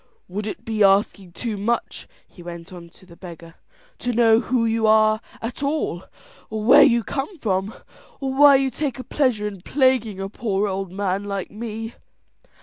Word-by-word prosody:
"Would 205 +4 -5
it - - -7
be 220 -2 +1
asking 195 -2 +2
too 220 +2 -4
much," 230 +4 -2 0.2
he 180 - -16
went 170 +1 -9
on 170 -1 -11
to 185 - -20
the 170 - -16
beggar, 170 -2 -11 0.5
"to 245 - -2
know 225 -1 +4
who 245 -1 0
you 225 -1 +1
are 215 0 +4 0.2
at 235 +4 -5
all, 280 - -2 0.4
or 215 0 -4
where 235 - +7
you 235 -4 +5
come 280 - -4
from, 195 -5 -2 0.4
or 270 -1 -3
why 285 +1 +7
you 270 -1 +1
take 275 0 -3
a 255 - -6
pleasure 255 -9 0
in 200 -3 -8
plaguing 250 -4 +1
a 195 - -3
poor 205 -1 -2
old 195 -1 -4
man 195 0 -2
like 200 -2 -4
me?" 225 +1 -6
215 Hz, 180 wpm, -22 LUFS, 195-240 Hz, 0.5 s, where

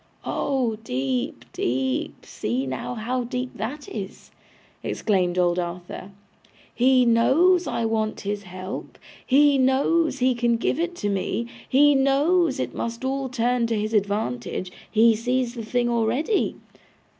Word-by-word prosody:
'Oh 255 -6 -1
deep, 130 - -2
deep! 130 +1 -2
See 125 +5 -2
now 130 - -4
how 245 +3 -2
deep 250 +1 -4
that 275 +6 -5
is!' 200 -3 -7 0.5
exclaimed 185 -4 0
old 175 0 +2
Arthur. 175 +2 -6 0.6
'He 255 +1 +4
knows 320 +11 +4
I 230 - -1
want 220 -1 -1
his 205 0 -3
help, 185 0 -7 0.3
he 280 +1 +4
knows 275 +4 +2
he 255 0 +3
can 235 -1 +1
give 255 +5 -1
it 345 -3 -3
me, 205 +3 -1 0.2
he 290 +2 +6
knows 280 +3 +2
it - - -2
must 235 +2 -4
all 270 0 -1
turn 245 -1 +1
to 225 -1 0
his 215 +2 -2
advantage, 195 - -1 0.2
he 225 0 +5
sees 245 +2 -1
the 235 -2 -6
thing 240 +2 0
already. 240 - +1
235 Hz, 135 wpm, -24 LUFS, 200-265 Hz, 0.6 s, he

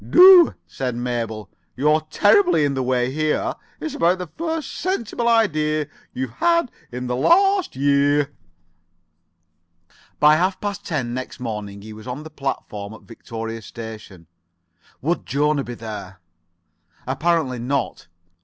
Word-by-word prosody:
"Do," 365 -1 +8
said 125 -3 -4
Mabel. 115 -3 -3 0.3
"You're 150 +3 +3
terribly 360 - +4
in 140 - 0
the 135 - -1
way 125 0 0
here. 155 +2 0 0.3
It's 155 - -4
about 175 +2 +2
the 180 - -5
first 320 - -4
sensible 240 - -2
idea 155 -10 +2 0.2
you've 130 -2 -4
had 335 - +1 0.2
for 125 - -6
this 125 - -4
last 370 - +3
year." 145 +1 +2 1.9
By 150 +1 +6
half 185 +3 0
past 205 -1 -4
ten 130 -8 -2
next 130 +1 -6
morning 105 -4 -5
he 110 0 -9
was 110 +3 -11
on 130 +4 -5
the 155 - -10
platform 110 -7 -5
at - - -14
Victoria 115 -1 -7
station. 110 -6 -10 0.8
Would 170 +5 -1
Jona 145 +1 +1
be 120 - -7
there? 105 -5 -8 0.9
Apparently 135 -1 0
not. 135 -3 -2
140 Hz, 135 wpm, -22 LUFS, 120-175 Hz, 1.9 s, Do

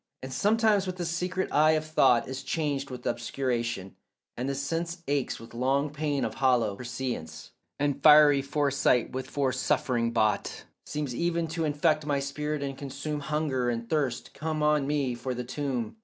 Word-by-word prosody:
And 130 0 -6
sometimes 210 - +3
when 185 - -3
the 175 -1 -3
secret 180 +3 -2
eye 155 +1 +5
of 155 0 0
thought 125 -6 +3
Is 130 +1 -5
changed 140 -1 -2
with 125 -1 -8
obscuration, 120 -5 -2 0.4
and 125 +3 -3
the 140 - -1
sense 165 +5 -3
Aches 140 -2 -1
with 115 - -12
long 135 +4 +1
pain 150 -2 -1
of - - -3
hollow 125 -6 +2
prescience, 120 -10 -5 0.3
And 145 -1 -1
fiery 150 -2 +7
foresight 140 -3 +1
with 130 0 -5
foresuffering 130 -3 0
bought 110 -3 0 0.2
Seems 150 -4 -3
even 170 +4 0
to 165 0 -1
infect 155 +1 +1
my 145 -1 +1
spirit 150 +1 -3
and 135 -1 -3
consume, 140 +2 -5
Hunger 145 -4 -1
and 115 -1 -3
thirst 135 -4 -1
come 155 0 -2
on 150 -2 +3
me 140 -4 0
for 125 +1 -4
the 125 - -3
tomb. 130 - -3
140 Hz, 170 wpm, -28 LUFS, 125-150 Hz, 0.4 s, fiery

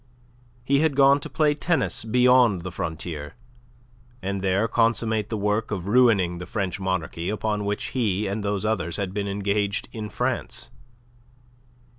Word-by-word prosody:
He 140 +2 +2
had 155 -2 +2
gone 140 +1 +6
to - - -7
play 150 -2 +2
tennis 160 -1 0
beyond 125 -3 +4
the 90 - -5
frontier 80 -3 -5 0.8
and 100 -2 -3
there 95 +3 +1
consummate 115 -2 +1
the 110 - -2
work 105 +2 0
of 95 -3 -4
ruining 100 -7 +3
the 90 - -7
French 100 -2 -2
monarchy 95 -2 -2
upon 105 -1 -1
which 100 0 -2
he 105 -5 0
and 100 +2 -3
those 100 0 -1
others 90 -6 -1
had 95 -2 -3
been 100 0 -2
engaged 100 +2 -1
in 110 -2 -6
France. - - -3
105 Hz, 150 wpm, -24 LUFS, 95-115 Hz, 0.8 s, gone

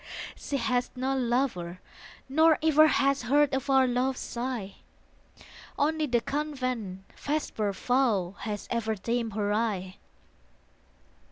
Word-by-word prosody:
She 280 - -3
has 245 0 0
no 260 +2 -1
lover, 235 -9 -1 0.5
nor 315 +3 +5
ever 310 0 +6
Has 275 -2 +2
heard 285 +3 +3
afar 265 0 +3
love's 250 +1 0
sigh. 235 -5 -4 1.0
Only 310 +1 +1
the 240 -3 +2
convent's 255 -10 -3 0.2
vesper 285 -8 -1
vow 215 -5 +1
Has 210 -2 -5
ever 225 -2 0
dimmed 230 +2 -2
her 205 -1 0
eye. 200 -4 -1
250 Hz, 110 wpm, -28 LUFS, 215-275 Hz, 1.0 s, ever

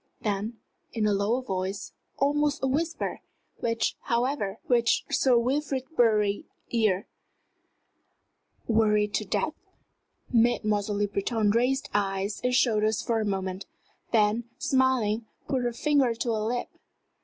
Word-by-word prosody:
then, 210 +2 -2 0.4
in 225 -3 0
a 210 - +3
lower 210 +6 +1
voice, 190 -2 -3 0.2
almost 290 +1 +1
a - - +3
whisper, 320 +5 -2 0.4
which, 230 -1 0
however, 235 -4 0
reached 235 -2 +2
Sir 255 -3 +4
Wilfrid 265 +2 0
Bury's 210 -4 +3 0.3
ears 215 -5 +2 1.6
"worried 210 -2 +2
to - - 0
death?" - - -1 0.8
Mademoiselle 215 -3 +2
Le 205 0 +1
Breton 205 +1 0
raised 250 +5 +1
eyes 195 0 -1
and 250 0 +2
shoulders 215 -3 +2
for 230 -2 0
a - - -1
moment, 190 -1 -3 0.4
then, 220 +1 +2
smiling, 260 -7 +1 0.2
put 265 -2 0
her 240 -1 0
finger 270 -1 +2
to 235 0 -1
her 220 - 0
lip. 235 +3 -2
230 Hz, 125 wpm, -27 LUFS, 210-250 Hz, 1.6 s, Sir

